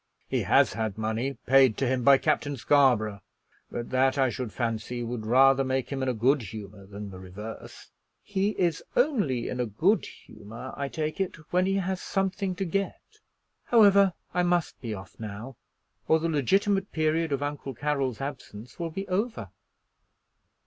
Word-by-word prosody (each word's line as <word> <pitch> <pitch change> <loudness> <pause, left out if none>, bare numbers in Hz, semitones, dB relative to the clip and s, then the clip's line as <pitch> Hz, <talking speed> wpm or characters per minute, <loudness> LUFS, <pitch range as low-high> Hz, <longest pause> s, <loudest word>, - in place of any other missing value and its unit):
"He - - 0
has - - +4
had 110 -1 -3
money 110 +5 -2
paid 130 -3 +5
to 135 - 0
him 130 0 0
by 140 +2 +7
Captain 145 -1 0
Scarborough; 120 -7 +3 0.5
but 120 - -5
that 130 +2 +2
I 130 -2 +3
should 125 -2 -4
fancy 120 +1 -3
would 115 -2 -4
rather 135 +3 +5
make 130 0 -2
him 135 -1 -2
in 130 - 0
a 125 - -1
good 130 +5 +3
humor 100 -1 -9
than 100 0 -8
the 95 - -9
reverse." 100 +4 -9 0.3
"He 205 +1 -1
is 170 -3 +1
only 205 - +1
in 125 - -4
a 125 - 0
good 175 - +2
humor, 110 +5 -10
I 140 - -3
take 155 +3 -3
it, 190 - -2 0.2
when 180 +1 +3
he 195 - +1
has 190 -1 -1
something 195 -1 -1
to 195 +1 -2
get. 195 - -4 0.5
However, 200 -5 +6 0.2
I 180 - +2
must 175 -1 0
be 115 -4 -5
off 95 -3 -8
now, 110 +4 -7 0.5
or 160 - +5
the 165 +1 -1
legitimate 195 - +1
period 160 0 0
of 140 0 -1
Uncle 145 -2 -4
Carroll's 135 -3 -1
absence 125 -3 -7
will 170 -1 -2
be 195 +5 -5
over." 210 +6 -2
135 Hz, 170 wpm, -27 LUFS, 115-175 Hz, 0.5 s, by